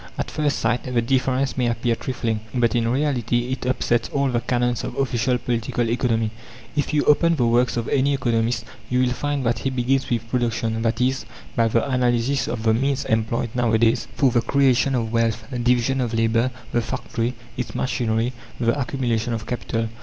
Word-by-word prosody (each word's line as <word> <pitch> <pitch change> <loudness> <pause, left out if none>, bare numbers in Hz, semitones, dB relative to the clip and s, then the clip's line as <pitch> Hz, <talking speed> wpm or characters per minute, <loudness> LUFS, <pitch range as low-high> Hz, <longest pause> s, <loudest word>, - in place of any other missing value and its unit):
At - - -3
first 150 -2 0
sight 125 - +1
the 120 - +2
difference 130 +2 +1
may 125 -2 +1
appear 120 0 0
trifling, 115 -2 -2 0.2
but 120 -2 +2
in 115 -2 +1
reality 125 -2 0
it 130 -1 -3
upsets 120 -2 +1
all 140 -1 +1
the 120 -2 0
canons 120 -1 0
of - - -5
official 125 -2 +1
Political 120 -1 -1
Economy. 115 -3 +1 0.4
If 145 - 0
you 150 -1 +2
open 170 +3 +4
the 125 -6 +1
works 120 +1 +2
of 115 - -2
any 140 +1 +2
economist 115 -3 0 0.2
you 125 0 +2
will 125 -1 +2
find 145 0 -2
that 115 -1 +1
he 135 - -1
begins 130 +1 0
with 115 -1 -1
PRODUCTION, 115 -2 -1
i. 115 -1 +2
e., 130 +1 +3 0.4
by 115 -2 +3
the 115 +4 +1
analysis 125 0 +1
of 115 -2 -3
the 110 -1 +4
means 135 +4 0
employed 110 +1 0
nowadays 115 -1 +2
for 135 -3 +3
the 120 - +3
creation 135 +1 +3
of 115 -2 -1
wealth: 115 -1 +1 0.2
division 125 +2 +2
of 120 -2 -1
labour, 115 +2 +2 0.2
the 120 - +2
factory, 115 +2 -3 0.2
its 125 - -4
machinery, 120 -1 0 0.3
the 120 +3 +1
accumulation 120 -3 -1
of 110 -2 -4
capital. 115 -2 -2
120 Hz, 185 wpm, -23 LUFS, 115-130 Hz, 0.4 s, open